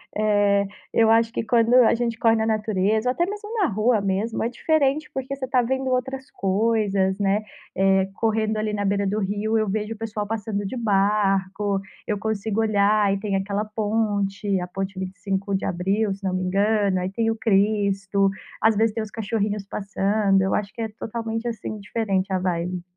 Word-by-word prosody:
Eh, 205 -1 +2 0.3
eu 225 -1 +4
acho 225 +1 +3
que - - -1
quando 230 +1 +2
a 250 -2 +6
gente 230 -1 -2
corre 225 -1 +4
na 220 0 0
natureza 215 +1 +1
ou - - +4
até 345 - +1
mesmo 415 +2 -6
na 405 - +3
rua 215 0 +2
mesmo 200 +3 -1
é - - +1
diferente, 300 +3 +1
porque 265 +1 -4
você 265 -1 -4
está 255 -1 +2
vendo 265 +2 -1
outras 265 +1 -2
coisas, 195 -1 +1
né. 200 +1 +1 0.3
Eh, 190 0 +3
correndo 220 0 0
ali 215 0 -1
na 205 -1 -1
beira 200 0 +1
do 205 +2 0
rio, 210 +2 0
eu 215 -1 +1
vejo 210 +2 -2
o - - -16
pessoal 215 -1 -4
passando 210 -1 -3
de 255 - -5
barco. 200 -2 +1 0.3
Eu 210 -2 -1
consigo 220 0 -2
olhar 210 -1 +3
e 195 - 0
tem 200 -1 -2
aquela 200 +2 -1
ponte, 205 -2 -1
a 180 - -4
Ponte 190 +1 -5
25 195 +1 -3
de 190 - -2
Abril, 195 +4 0
se 195 +1 -12
não 190 -1 -1
me 185 - -1
engano. 200 +1 +2
Aí 180 +1 -3
tem 225 +2 0
o - - -2
Cristo, 200 -3 +2 0.3
às 220 0 +4
vezes 220 0 +2
tem 225 - -2
os 215 - -8
cachorrinhos 210 -2 -2
passando. 200 0 +1
Eu 190 - 0
acho 210 -1 -1
que 230 - -6
é 225 - -2
totalmente, 225 +1 -4
assim, 215 -2 -5
diferente 200 -2 -1
a 190 - +2
vibe. 180 0 -2
210 Hz, 195 wpm, -23 LUFS, 195-225 Hz, 0.3 s, a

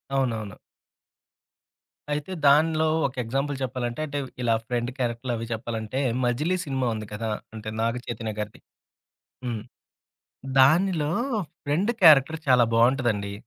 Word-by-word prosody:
అవునవును. 115 -6 -1 1.6
అయితే, 150 +5 -3
దానిలో 155 +2 +4 0.2
ఒక 135 - -11
ఎగ్జాంపుల్ 135 +4 -2
చెప్పాలంటే 125 0 -3
అంటే, 145 -1 -3 0.2
ఇలా 115 -2 +2
ఫ్రెండ్ 120 0 -1
క్యారెక్టర్లవి 120 -1 -2
చెప్పాలంటే, 115 +2 -4 0.2
'మజిలీ' 150 +10 0
సినిమా 130 -3 -1
ఉంది 110 -1 -6
కదా! 110 +1 -3 0.3
అంటే, 110 0 -6
నాగచైతన్య 115 -1 -3
గారిది. 105 0 -6 0.8
హ్మ్. 115 -3 -3 1.0
దానిలో 155 +2 +4 0.5
ఫ్రెండ్ 170 +11 +1
క్యారెక్టర్ 155 -1 +7
చాలా 125 -2 +6
బావుంటదండి. 115 -4 +2
125 Hz, 105 wpm, -25 LUFS, 115-145 Hz, 1.6 s, క్యారెక్టర్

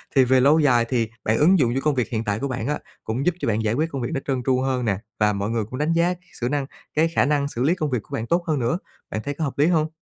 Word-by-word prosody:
Thì 135 - +7
về 130 +1 +4
lâu 150 +5 +5
dài 120 -5 +4
thì 115 -4 0
bạn 110 +1 +1
ứng 175 +4 +5
dụng 120 -3 +2
cho 135 - 0
công 150 -1 +1
việc 125 -3 0
hiện 115 -1 -2
tại 105 0 -1
của 140 - -2
bạn 120 -3 -3
á, 150 - -1 0.2
cũng 120 +6 -2
giúp 180 -1 +2
cho - - -2
bạn 110 0 +1
giải 110 0 +1
quyết 155 +5 0
công 135 - -3
việc 120 - -2
nó - - 0
trơn 130 -3 -1
tru 130 -1 +2
hơn 130 -2 0
nè, 100 -3 +1 0.2
và 105 -1 +3
mọi 100 +2 -2
người 115 -1 0
cũng 130 - -6
đánh 155 +3 +1
giá 170 +2 +2
cái 180 0 -17
xử 120 - 0
năng 145 -2 -1 0.3
cái 160 +2 +3
khả 165 - +2
năng 140 -1 +1
xử 125 -3 -3
lý 160 +6 +3
công 155 -5 -2
việc 125 -4 0
của - - -14
bạn 115 - -3
tốt 170 +5 +1
hơn 150 -4 +1
nữa. 120 +7 0 0.3
Bạn 110 - -2
thấy 145 - -3
có 160 - -4
hợp 140 - -3
lý 150 - +5
hông? 160 -3 +2
135 Hz, 335 wpm, -23 LUFS, 115-150 Hz, 0.3 s, Thì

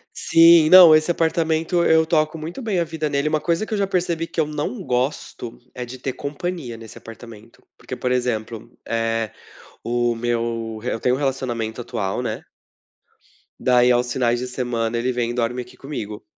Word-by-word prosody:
Sim, 165 -1 +6
não, 180 -3 +10
esse 155 +2 +2
apartamento, 165 +1 0
eu 160 0 +4
toco 155 -1 +1
muito 160 - -7
bem 215 -6 -1
a - - +2
vida 160 -2 -3
nele. 140 +1 0
Uma 155 0 +1
coisa 170 +5 -1
que 220 - -6
eu - - 0
já 200 -1 0
percebi 175 -3 -1
que - - -6
eu 150 - -1
não 150 +9 -4
gosto 125 -3 -3 0.2
é 125 - -6
de 125 +2 -9
ter 130 +1 -3
companhia 145 -2 -5
nesse 115 -1 -12
apartamento, 115 -1 -13
porque - - -7
por 125 - -2
exemplo, 120 -3 -2 0.2
eh, 115 -1 -1 0.5
o 120 0 0
meu 115 -1 -2
re 125 +3 -3
eu - - -3
tenho 125 +2 +1
um - - -4
relacionamento 125 -5 -3
atual, 110 -5 -3
né. - - -4 1.2
Daí 125 -1 +4
aos 120 0 +1
finais 120 -2 +1
de 125 - -4
semana 120 -2 -2
ele 125 +2 0
vem 120 -1 -1
e - - -5
dorme 120 +1 -1
aqui 125 0 -13
comigo. 110 -8 -7
125 Hz, 185 wpm, -21 LUFS, 115-160 Hz, 1.2 s, não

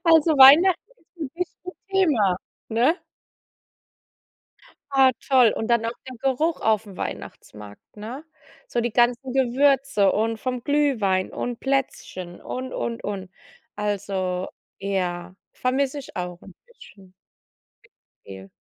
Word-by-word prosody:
Also 325 -1 +5
Weihnachten 300 +7 +8 0.4
ist - - -28
'n 265 - -5
bisschen 360 +1 -6 0.2
Thema, 285 - +3 0.3
ne? 245 +9 +2 2.0
Ah, 265 -1 +5 0.2
toll. 255 -5 +5
Und 220 - -3
dann 235 -1 +3
noch 230 0 -2 0.2
der 255 - -8
Geruch 275 +6 0
aufm 215 -3 0
Weihnachtsmarkt, 105 -1 -8
ne? 230 +8 -7 0.4
So 240 - -1
die 240 0 -1
ganzen 245 +3 +1
Gewürze 265 -4 +3
und 225 +1 0
vom 250 +1 -4
Glühwein 245 -11 +1
und 245 -1 -4
Plätzchen 215 -10 -3
und, 255 0 -6
und, 235 -1 -4
und. 195 -2 -5 0.5
Also, 195 -3 -2 0.3
ja, 185 -2 -3 0.2
vermisse 265 +2 -1
ich 275 - -12
auch 180 -1 -5
'n 195 - -14
bisschen. 200 - -17 1.1
Viel. 95 0 -11
240 Hz, 120 wpm, -24 LUFS, 195-275 Hz, 2.0 s, Weihnachten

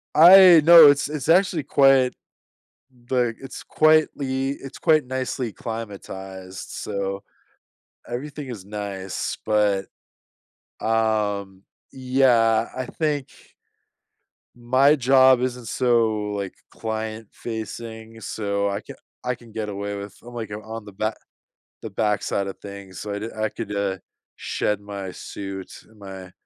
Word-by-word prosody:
I 175 0 +9
no, 165 -1 +10
it's 140 0 +2
it's 150 0 -4
actually 175 -3 +3
quite 135 -2 +4 1.0
like, 120 -3 +1
it's 135 -1 -9
quietly 140 -4 +2
it's 135 -1 -8
quite 155 -2 +3
nicely 130 -3 -3
climatized, 95 -4 -7
so, 100 0 -4 0.9
everything 140 +4 -6
is 110 -7 -8
nice, 100 -2 -4
but, 105 -2 +2 1.0
um, 105 -3 0 0.3
yeah, 125 -4 +2
I 130 -1 -3
think 145 -1 -2 1.3
my 130 +5 +4
job 130 -1 +5
isn't 125 -2 -3
so, 110 -4 +1
like, 100 -2 -4 0.2
client-facing, 110 +1 -6
so 100 -2 -2
I 100 +1 -3
ca - - -11 0.3
I 125 0 -1
can 120 -1 -17
get 110 -1 -4
away 100 0 -4
with 100 0 -8
I'm, 120 +1 -11
like, 115 -3 -5
I'm 105 +1 -6
on 110 -1 -7
the 105 - -11
ba 110 +2 -1 0.7
the 110 - -6
backside 100 -1 -1
of 95 - -7
things, 100 -2 -9
so 105 -1 -5
I 100 - -3
d 110 - -4
I 110 0 0
could, 105 - -6
uh, 100 -2 -1 0.4
shed 105 -1 -2
my 100 -2 -6
suit 95 0 -7 0.2
and 110 -1 -22
my 95 -2 -9
110 Hz, 130 wpm, -23 LUFS, 100-130 Hz, 1.3 s, no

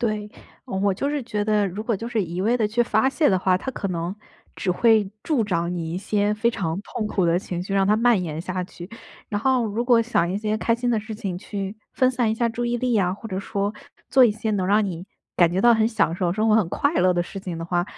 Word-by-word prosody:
对， 215 -3 -2 0.4
嗯 190 - -3
我 200 -1 +2
就 280 +9 -2
是 295 -1 -1
觉 210 -3 -2
得， 210 -1 +2
如 195 +3 -5
果 225 -1 -1
就 230 +4 -6
是 230 -3 0
一 175 0 -4
味 225 +5 +2
地 220 -3 +1
去 225 +3 -1
发 265 +2 +2
泄 295 +3 +2
的 190 - +3
话， 185 0 +2
它 235 - -8
可 200 - -3
能 175 +1 -3 0.4
只 185 - -2
会 215 +1 +3
助 290 -8 +1
长 175 -4 -1
你 165 -2 -4
一 175 - -2
些 205 +1 0
非 220 +2 +1
常 185 -6 -2
痛 215 - -4
苦 190 -4 +1
的 170 +1 +3
情 180 -2 -3
绪， 195 +2 -4
让 195 - +3
它 210 +2 +3
蔓 230 -2 +3
延 160 -2 -4
下 185 +1 -3
去。 175 -1 -10 0.4
然 205 -1 -2
后 255 -1 +2
如 220 +3 -2
果 240 -2 +5
想 225 -7 +1
一 195 - -1
些 215 0 -1
开 230 - 0
心 245 +1 -2
的 230 -3 +1
事 220 +1 -8
情 195 -4 -4
去 200 +1 -5 0.2
分 255 - +3
散 245 -3 +1
一 - - 0
下 235 +1 +1
注 235 +1 -3
意 240 0 0
力 245 -1 0
啊， 185 -3 +2
或 205 - -8
者 190 -1 -3
说 200 +1 -2 0.3
做 260 -1 +6
一 235 - +5
些 220 +1 -3
能 195 -3 0
让 210 +2 +3
你 175 -1 -6 0.3
感 175 -2 +5
觉 185 - +1
到 235 +2 +6
很 220 0 +3
享 210 -8 +1
受 175 -1 0
生 215 +4 +1
活、 215 - +5
很 215 -6 +3
快 285 - 0
乐 185 - +4
的 175 - 0
事 195 +3 -5
情 180 -3 -5
的 165 - -4
话， 175 0 0
210 Hz, 295 characters per minute, -23 LUFS, 185-230 Hz, 0.4 s, 做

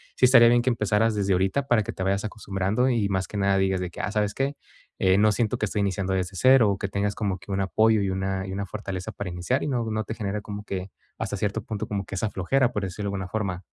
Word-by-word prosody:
sí - - +4
estaría 120 -2 +7
bien 120 0 +4
que 125 - +1
empezaras 110 0 +1
desde 100 -1 +1
ahorita 95 +10 +1
para 120 -4 +3
que - - -5
te 95 - -4
vayas 100 +1 0
acostumbrando 105 +3 -1
y 115 -5 +1
más 95 -1 -1
que 105 - -6
nada 100 0 +2
digas 95 -1 +1
de 90 - -3
que: - - -11
"Ah, 95 - -2
¿sabes 105 -1 0
qué?, 135 +2 -1 0.4
eh, 95 0 +4
no 105 +1 +5
siento 110 +1 0
que - - 0
estoy 105 - -1
iniciando 95 -1 -1
desde 95 0 -3
0", 125 -7 +5
que 100 - -2
tengas 100 0 0
como 100 -4 -1
que 100 +2 -10
un 95 0 0
apoyo 110 +3 +3
y 100 - 0
una 95 0 -2
y 95 - -5
una 100 +1 -3
fortaleza 95 -2 -5
para 100 -2 -5
iniciar, 90 +10 -1
y - - -2
no 125 -5 -1
no 110 0 -1
te 110 - -5
genere 105 -1 -3
como 105 0 -7
que, 95 -1 -4 0.3
hasta - - -3
cierto 105 +1 -1
punto, 105 -1 -4
como 100 -2 -3
que - - -7
esa 105 +3 -1
flojera, 125 +7 +1
por 105 - -1
decirlo 95 +2 -4
de - - -3
alguna 95 -1 -4
forma. 95 -4 -3
100 Hz, 270 wpm, -25 LUFS, 95-110 Hz, 0.4 s, estaría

